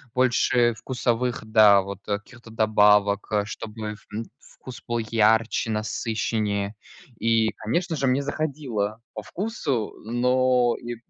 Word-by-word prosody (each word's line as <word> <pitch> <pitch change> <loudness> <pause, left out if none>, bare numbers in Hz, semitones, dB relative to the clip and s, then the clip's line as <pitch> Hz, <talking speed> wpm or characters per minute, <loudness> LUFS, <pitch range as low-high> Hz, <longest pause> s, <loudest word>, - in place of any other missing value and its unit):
больше 120 -1 +3
вкусовых, 125 +1 -2
да, 110 -2 +6
вот 100 0 -7
каких-то 110 +3 -6
добавок, 105 -2 +3
а, 105 -1 +1
чтобы 110 0 -6 0.2
вн 110 +2 -4 0.2
вкус 130 -2 -12
был 120 0 -1
ярче, 110 +1 +2
насыщеннее. 110 -1 -2 0.4
И, 115 0 +2
конечно 165 - -1
же, 135 -2 0
мне 130 +2 +2
заходило 135 -8 -3
по 105 - -6
вкусу, 155 - -3
но 125 +1 +2
и 120 0 -5
115 Hz, 120 wpm, -24 LUFS, 105-125 Hz, 0.4 s, да